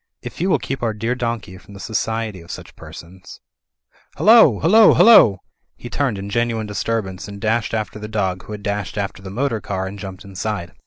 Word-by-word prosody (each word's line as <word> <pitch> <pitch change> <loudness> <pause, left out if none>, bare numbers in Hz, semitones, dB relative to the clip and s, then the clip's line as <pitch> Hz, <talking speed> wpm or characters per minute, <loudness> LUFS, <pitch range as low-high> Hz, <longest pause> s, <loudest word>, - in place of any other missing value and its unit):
If - - -8
you 185 - +1
will - - +4
keep 135 - -5
our 115 -2 -1
dear 115 +3 -1
donkey 115 -7 -4
from 100 - -15
the - - -11
society 110 -2 -3
of 85 - -16
such - - -9
persons 90 +2 -12 0.4
— - - -34
Hullo! 215 - +6
Hullo! 215 +7 +6
Hullo 115 - +7 0.2
!" - - -51
He 120 - -10
turned 130 -5 -1
in 100 +1 -6
genuine 115 -1 -1
disturbance, 105 -2 -3
and 100 -1 -9
dashed 110 +2 -1
after 110 -1 -4
the 105 - -7
dog, 95 -4 -2
who 105 - -8
had 105 -1 -8
dashed 105 -1 -3
after 100 -1 -4
the 95 - -8
motor 115 +1 -2
car 95 -1 -3
and 100 +2 -7
jumped 95 -2 -9
inside. 100 -2 -5
105 Hz, 210 wpm, -20 LUFS, 95-115 Hz, 0.4 s, Hullo